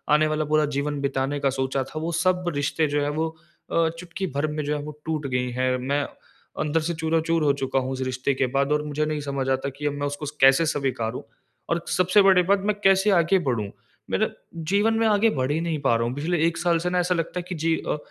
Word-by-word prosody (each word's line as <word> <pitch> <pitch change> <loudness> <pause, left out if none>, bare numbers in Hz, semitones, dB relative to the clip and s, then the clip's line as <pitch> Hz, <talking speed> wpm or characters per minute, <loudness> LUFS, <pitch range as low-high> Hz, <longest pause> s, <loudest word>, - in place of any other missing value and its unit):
आने 155 0 +3
वाला 155 0 -1
पूरा 155 0 +2
जीवन 145 0 -1
बिताने 140 +1 -1
का 140 -1 +2
सोचा 130 0 -1
था, 155 +4 -7
वो 165 +2 -2
सब 180 +2 +1
रिश्ते 145 +2 0
जो 145 0 0
है 145 - 0
वो 160 - +1 0.4
अ, 165 -1 +3
चुटकी 180 +2 -5
भर 150 +2 +1
में 150 0 -3
जो 150 +1 0
हैं 145 - -6
वो 150 0 -9
टूट 155 -3 -2
गई 125 -1 -1
हैं। 130 +1 0
मैं 140 +3 -1 0.6
अंदर 155 +1 +1
से 170 - -1
चूराचूर 160 0 0
हो 140 -1 +4
चुका 135 0 +1
हूँ 130 +1 -3
उस 130 0 -4
रिश्ते 130 +2 -1
के 130 0 0
बाद, 140 +1 +2
और 150 0 +2
मुझे 150 +1 -1
नहीं 155 -1 -2
समझ 140 -2 -2
आता 135 +1 0
कि 140 +2 -8
अब 145 - -1
मैं 145 0 -2
उसको 145 +1 -5 0.2
कैसे 135 +5 +6
स्वीकारूँ? 130 -6 -2 0.5
और 170 0 0
सबसे 185 +3 +4
बड़ी 190 -2 +6
बात, 200 +2 +3
मैं 205 +1 0
कैसे 195 +1 +4
आगे 190 +3 +3
बढ़ूँ? 105 -5 -2 0.4
मेरा - - +1 0.4
जीवन 210 +3 +3
में 225 - +2
आगे 215 +1 +4
बढ़ 130 -5 -1
ही 160 - 0
नहीं 165 -2 -1
पा 120 -4 +3
रहा 115 0 +1
हूँ। 125 - -3
पिछले 170 +5 -1
1 170 0 0
साल 170 -1 +2
से 180 - 0
ना 180 0 +1
ऐसा 180 0 +1
लगता 170 +2 -2
है - - -5
कि 180 - -3
जी 160 +1 +1
अ, - - 0
150 Hz, 250 wpm, -24 LUFS, 135-170 Hz, 0.6 s, कैसे